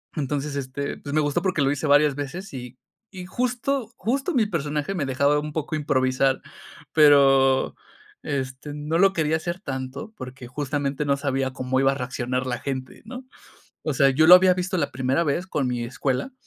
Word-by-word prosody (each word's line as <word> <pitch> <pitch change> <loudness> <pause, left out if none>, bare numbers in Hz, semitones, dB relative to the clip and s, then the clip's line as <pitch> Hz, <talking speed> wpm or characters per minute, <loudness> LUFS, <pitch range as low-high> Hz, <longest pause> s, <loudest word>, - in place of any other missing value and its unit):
Entonces, 145 0 -2
este, 140 +1 -4
pues, 145 - -7
me 155 - +3
gustó 145 -1 0
porque 185 -6 0
lo 135 0 +2
hice 145 +2 -2
varias 145 0 +4
veces 145 +6 -6
y 125 -1 -8 0.3
y, 185 -2 -8
justo 250 +3 -2
justo 270 +9 -1
mi 225 -4 +3
personaje 150 -2 -2
me 155 -7 -2
dejaba 140 +2 +2
un 150 0 -5
poco 155 0 -3
improvisar, 130 -2 +1 0.5
pero, 135 -3 +5 0.5
este, 135 0 -4
no 150 +3 -1
lo 195 0 +5
quería 160 -1 +1
hacer 175 +3 -4
tanto 135 +5 -6
porque 130 -1 -9
justamente 145 +1 -2
no 140 0 +1
sabía 135 -2 -1
cómo 130 0 -1
iba 135 0 +4
a - - -3
reaccionar 125 -1 -3
la 120 -2 -3
gente, 130 -2 -5
¿no? 255 0 -9 0.6
O 155 -3 -2
sea, 135 0 +4
yo 155 +4 +3
lo 180 - +11
había 185 0 +6
visto 185 +1 -2
la 145 -4 -1
primera 130 +6 0
vez 170 +5 -1
con 145 -7 -1
mi 120 -1 -2
escuela. 130 - -2
145 Hz, 185 wpm, -24 LUFS, 130-165 Hz, 0.6 s, lo